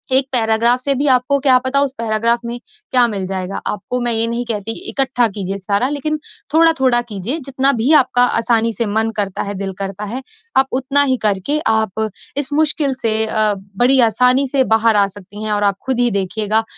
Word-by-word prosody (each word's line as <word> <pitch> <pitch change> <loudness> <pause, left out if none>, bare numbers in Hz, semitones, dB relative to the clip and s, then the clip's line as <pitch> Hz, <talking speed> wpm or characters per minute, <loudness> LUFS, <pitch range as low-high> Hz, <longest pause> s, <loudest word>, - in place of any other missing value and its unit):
1 265 0 +4
paragraph 235 +1 +3
से 275 +1 +1
भी 285 +2 -1
आपको 255 +2 +2
क्या 265 -2 +4
पता 260 +2 +1
उस 275 -2 -1
पैराग्राफ़ 230 +1 0
में 235 +1 -5 0.3
क्या 250 -2 +5
मिल 200 -4 -4
जाएगा, 190 0 -4
आपको 230 +5 -4
मैं 240 0 +1
ये 225 0 +3
नहीं 235 +1 -3
कहती 220 -1 -3 0.2
इकट्ठा 260 -3 +1
कीजिए 195 -2 -5
सारा 200 +5 -1
लेकिन 300 +1 -3 0.3
थोड़ा-थोड़ा 265 -7 +4
कीजिए 235 - -4
जितना 270 0 +1
भी 265 - +1
आपका 245 -1 +2 0.2
आसानी 230 -1 +1
से 230 +3 -2
मन 220 +2 -1
करता 200 -2 -2
है, 200 - -5
दिल 195 0 -5
करता 195 +1 -5
है, 260 +2 -4 0.4
आप 265 - +4
उतना 270 +2 +2
ही 260 -2 0
करके 210 +9 +1
आप 220 -1 0 0.3
इस 285 0 -1
मुश्किल 295 -2 +1
से 220 -1 +2
अ, 215 -1 +1 0.2
बड़ी 255 +3 +3
आसानी 250 +4 +2
से 265 0 +1
बाहर 225 -2 +2
आ 200 -1 +4
सकती 205 +2 -11
हैं 215 - -2
और 205 0 0
आप 200 -1 +1
खुद 260 -2 -1
ही 245 0 +2
देखिएगा, 210 +3 -1
235 Hz, 200 wpm, -17 LUFS, 210-265 Hz, 0.4 s, क्या